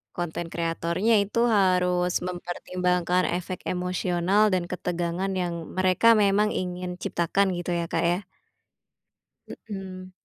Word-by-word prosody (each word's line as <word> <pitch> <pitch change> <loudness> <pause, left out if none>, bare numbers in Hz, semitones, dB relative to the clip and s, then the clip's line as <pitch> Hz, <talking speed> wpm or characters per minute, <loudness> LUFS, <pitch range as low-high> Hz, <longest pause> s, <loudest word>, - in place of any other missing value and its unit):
Konten 175 -1 -4
kreatornya 170 +6 0
itu 230 +4 +1
harus 180 -4 +2
mempertimbangkan 180 0 -1
efek 180 0 -6
emosional 180 +3 +1
dan 185 -3 0
ketegangan 175 +1 -2
yang 175 -2 -1 0.2
mereka 185 +5 +5
memang 205 0 +3
ingin 180 -2 -4
ciptakan 185 +3 0
gitu 175 0 -4
ya, 170 - -1
Kak, - - -1
ya. 175 - +1 1.5
Mhm. 185 -2 -7
180 Hz, 110 wpm, -26 LUFS, 175-190 Hz, 1.5 s, mereka